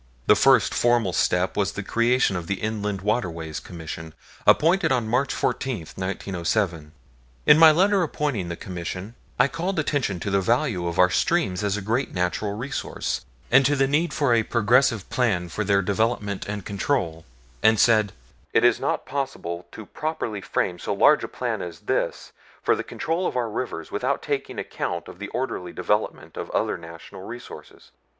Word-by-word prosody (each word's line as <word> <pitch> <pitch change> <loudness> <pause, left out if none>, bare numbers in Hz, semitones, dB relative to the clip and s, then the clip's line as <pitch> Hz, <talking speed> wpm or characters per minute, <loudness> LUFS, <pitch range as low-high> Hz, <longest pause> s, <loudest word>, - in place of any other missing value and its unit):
The - - +6
first - - +4
formal 120 -6 +2
step 90 +2 +1
was 100 -1 0
the 100 - -4
creation 115 0 +2
of 85 -2 -4
the 100 - 0
Inland 105 -3 -2
Waterways 85 -8 -2
Commission, 80 -1 -8 0.3
appointed 175 +3 +4
on 120 -4 +1
March 125 +4 +1
14, 130 -8 -1
1907. 90 -3 -2 0.5
In 150 - +7
my 165 -1 +10
letter 190 +5 +4
appointing 145 - -1
the 85 - -3
Commission, 90 +4 -6 0.2
I 125 - +5
called 170 +6 -3
attention 140 - 0
to 100 - -2
the 100 0 +2
value 115 - +1
of 85 - -3
our 90 0 +5
streams 90 +5 +1
as 100 0 0
great 115 +7 -1
natural 90 +3 -1
resources, 125 +6 -3 0.3
and 135 +2 +7
to 145 - +2
the 135 -1 +3
need 150 +4 +1
for 140 -5 +2
a 115 - +4
progressive 115 0 +2
plan 100 -9 +1
for 105 - -2
their 100 -1 +2
development 105 0 -1
and 105 -2 -5
control, 100 - -1 0.4
and 110 0 +4
said: 110 -3 +4 0.4
"It - - +4
is - - +4
not - - -1
possible 90 -11 -4
to 110 - -9
properly 150 -10 -4
frame 90 -2 -1
so - - -2
large - - +5
a - - -2
plan - - -3
as 85 -2 -7
this - - -2 0.3
for - - +3
the - - -4
control 170 +3 -2
of - - -3
our 120 -3 -1
rivers 105 -8 -4
without - - -1
taking - - -3
account 85 -2 -4
of 90 - -11
the 105 - -5
orderly 120 -8 -3
development 105 +1 -2
of - - -5
other - - 0
natural 85 +2 -11
resources. 120 +5 -10
105 Hz, 170 wpm, -24 LUFS, 90-125 Hz, 0.5 s, my